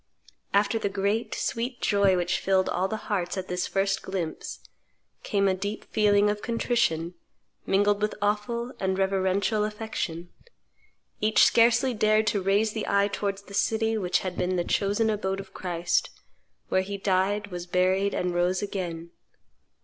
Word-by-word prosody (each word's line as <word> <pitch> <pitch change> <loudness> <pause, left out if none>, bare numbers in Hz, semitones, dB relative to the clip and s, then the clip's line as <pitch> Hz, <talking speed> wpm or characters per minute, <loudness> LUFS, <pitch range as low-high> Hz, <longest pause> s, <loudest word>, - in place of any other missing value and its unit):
"After 205 +2 +2
the 200 - -1
great, 200 +4 -1
sweet 240 +1 -3
joy 200 -2 +3
which 175 0 0
filled 190 -1 +2
all 185 +2 0
hearts 205 -4 -2
at 185 - -4
this 180 0 -2
first 195 0 0
glimpse 180 -4 -5 0.6
came 200 -1 +1
a 190 - +3
deep 200 +3 -4
feeling 205 -1 +4
of 210 0 -1
contrition, 230 -8 0 0.5
mingled 205 +1 +2
with 210 - 0
awful 210 +4 -1
and 190 0 0
reverential 195 +2 +1
affection. 210 -6 -4 0.9
Each 215 +1 +4
scarcely 240 +2 +4
dared 215 0 +3
to 205 -3 -1
raise 205 +3 +2
the 220 - -3
eye 200 0 +2
towards 200 0 -3
the 200 - -13
city 225 +2 +1
which 185 -4 0
had 185 -1 -3
been 180 +1 -1
the 175 - +1
chosen 205 +5 +1
abode 195 -2 -2
of 195 -1 -10
Christ, 175 -1 -1 0.6
where 185 - +2
He 200 +1 -5
died, 200 +1 0
was 175 0 -6
buried, 185 +2 +1
and 180 -1 -1
rose 180 +2 +1
again. 170 -4 -5
200 Hz, 155 wpm, -26 LUFS, 185-210 Hz, 0.9 s, feeling